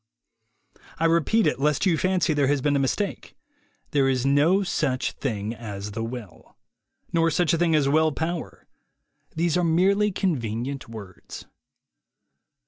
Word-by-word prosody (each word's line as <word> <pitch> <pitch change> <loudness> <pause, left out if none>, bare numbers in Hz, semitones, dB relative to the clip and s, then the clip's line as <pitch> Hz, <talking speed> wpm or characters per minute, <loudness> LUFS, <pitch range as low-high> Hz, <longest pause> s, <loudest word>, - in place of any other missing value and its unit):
I 165 - 0
repeat 170 +7 +3
it, - - 0
lest 150 +5 +1
you 180 -4 +3
fancy 185 -2 +1
there 145 -2 +2
has 145 +1 +2
been 145 +2 +1
a - - +2
mis 135 -2 +1
print. - - -5 0.6
There 135 -2 +2
is 130 -1 0
no 150 +8 +3
such 130 -8 -1
thing 110 -4 -4
as 105 -3 -7
the 115 +2 -4
will. 115 -9 -9 0.6
Nor 165 0 +3
such 160 0 +1
a - - +2
thing 170 -2 +2
as 145 -3 +2
will 155 +2 +3
power. 160 +3 -5 0.7
These 170 0 +1
are 180 - +1
merely 195 +5 +2
con 180 -6 0
venient 120 +4 -4
words. 100 -5 -10
145 Hz, 155 wpm, -24 LUFS, 125-170 Hz, 0.7 s, repeat